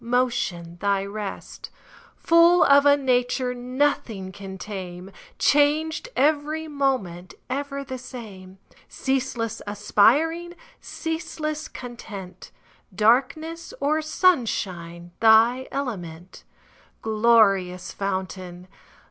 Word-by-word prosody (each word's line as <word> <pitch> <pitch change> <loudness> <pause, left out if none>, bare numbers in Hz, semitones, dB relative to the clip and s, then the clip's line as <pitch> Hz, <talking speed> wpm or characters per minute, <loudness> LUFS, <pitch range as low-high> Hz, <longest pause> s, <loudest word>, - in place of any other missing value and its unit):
Motion 230 -9 -1
thy 200 -1 +1
rest; 205 0 -7 0.5
Full 335 +1 +5
of 280 0 +6
a 285 0 +6
nature 250 -1 0
Nothing 245 -6 -1
can 190 0 -9
tame, 185 -2 -7 0.3
Changed 310 +9 +2
every 305 +2 +1
moment, 255 - -2 0.2
Ever 280 +1 -3
the 260 -1 -7
same; 200 -7 -10 0.3
Ceaseless 250 -4 -2
aspiring, 290 - +2 0.2
Ceaseless 315 -1 -4
content, 205 -7 -9 0.5
Darkness 275 - +1
or 300 +3 +1
sunshine 190 - 0
Thy 230 +3 +5
element; 185 -10 -6 0.6
Glorious 210 -5 +3
fountain. 185 -2 -5
240 Hz, 85 wpm, -24 LUFS, 195-285 Hz, 0.6 s, of